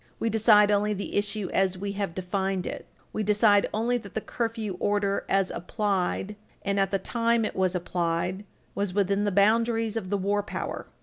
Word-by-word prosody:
"We 230 Hz, -, -1 dB
decide 210 Hz, -1 st, +5 dB
only 210 Hz, +1 st, +2 dB
the 200 Hz, -, -5 dB
issue 205 Hz, -1 st, -1 dB
as 190 Hz, -1 st, +2 dB
we 200 Hz, +2 st, -3 dB
have 200 Hz, -4 st, -3 dB
defined 190 Hz, 0 st, -2 dB
it -, -, -6 dB, 0.3 s
we -, -, -1 dB
decide 210 Hz, 0 st, +4 dB
only 235 Hz, +3 st, 0 dB
that 200 Hz, -4 st, -12 dB
the -, -, +1 dB
curfew 225 Hz, -5 st, -3 dB
order, 205 Hz, -1 st, 0 dB
as 195 Hz, -1 st, +2 dB
applied, 195 Hz, +1 st, -1 dB, 0.3 s
and 200 Hz, 0 st, 0 dB
at 195 Hz, -1 st, +2 dB
the 195 Hz, -, +1 dB
time 230 Hz, +3 st, +1 dB
it -, -, -4 dB
was 185 Hz, -1 st, +1 dB
applied, 175 Hz, +2 st, -1 dB, 0.3 s
was 200 Hz, -2 st, -2 dB
within 200 Hz, 0 st, +1 dB
the 205 Hz, -, +1 dB
boundaries 225 Hz, +3 st, +2 dB
of 205 Hz, -5 st, -3 dB
the 205 Hz, -, +1 dB
war 200 Hz, +2 st, 0 dB
power." 205 Hz, -, -5 dB
205 Hz, 185 wpm, -27 LUFS, 190-215 Hz, 0.3 s, decide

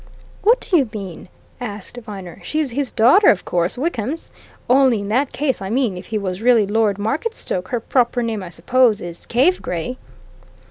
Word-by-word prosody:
"What 470 Hz, +4 st, +4 dB
do 360 Hz, -, +2 dB
you 270 Hz, -7 st, +1 dB
mean?" 195 Hz, -5 st, -8 dB, 0.3 s
asked 215 Hz, -1 st, -5 dB
Viner. 200 Hz, -7 st, -8 dB
"She's 305 Hz, -4 st, -1 dB
his 270 Hz, +1 st, -2 dB
daughter, 270 Hz, -, +5 dB
of 195 Hz, -, +2 dB
course 175 Hz, +5 st, 0 dB
Wickham's. 285 Hz, 0 st, -3 dB, 0.4 s
Only, 255 Hz, -4 st, +4 dB
in 200 Hz, -, -5 dB
that 260 Hz, +5 st, +1 dB
case 275 Hz, -5 st, -1 dB
I 190 Hz, -, -4 dB
mean, 235 Hz, -3 st, 0 dB
if 180 Hz, -, -9 dB
he 220 Hz, -, -2 dB
was 190 Hz, -1 st, -3 dB
really 235 Hz, -3 st, +4 dB
Lord 210 Hz, -1 st, +1 dB
Marketstoke 220 Hz, -, -2 dB
her 240 Hz, -, -1 dB
proper 245 Hz, +1 st, +1 dB
name, 225 Hz, -3 st, -2 dB
I 180 Hz, -, -7 dB
suppose, 220 Hz, +6 st, +2 dB
is 175 Hz, -3 st, -9 dB
Cave 285 Hz, +10 st, +2 dB
Gray." 180 Hz, +9 st, -4 dB
230 Hz, 180 wpm, -20 LUFS, 200-265 Hz, 0.4 s, daughter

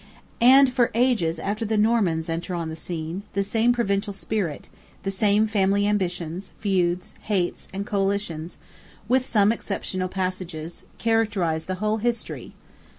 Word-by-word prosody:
And 260 Hz, +1 st, +7 dB
for 245 Hz, -1 st, +3 dB
ages 230 Hz, -10 st, +2 dB
after 205 Hz, +6 st, -2 dB
the 220 Hz, 0 st, 0 dB
Normans 210 Hz, -7 st, +2 dB
enter 170 Hz, +2 st, -3 dB
on 165 Hz, -2 st, -3 dB
the 160 Hz, -, -5 dB
scene, 165 Hz, +2 st, -4 dB
the 200 Hz, -, +1 dB
same 225 Hz, +4 st, +2 dB
provincialized 200 Hz, -4 st, 0 dB
spirit, 195 Hz, -9 st, -3 dB, 0.4 s
the 195 Hz, -, -1 dB
same 205 Hz, +2 st, +3 dB
family 200 Hz, -2 st, +2 dB
ambitions, 180 Hz, -3 st, -2 dB
feuds, 180 Hz, -3 st, 0 dB
hates, 190 Hz, -5 st, -1 dB
and 195 Hz, +1 st, -4 dB
coalitions, 195 Hz, -5 st, -1 dB, 0.5 s
with 255 Hz, +2 st, +2 dB
some 210 Hz, -1 st, +4 dB
exceptional 185 Hz, -4 st, -3 dB
passages, 185 Hz, -3 st, -4 dB
characterize 205 Hz, -8 st, +1 dB
the 185 Hz, -, -2 dB
whole 215 Hz, +3 st, 0 dB
history. 235 Hz, +1 st, -3 dB
200 Hz, 140 wpm, -24 LUFS, 175-220 Hz, 0.5 s, And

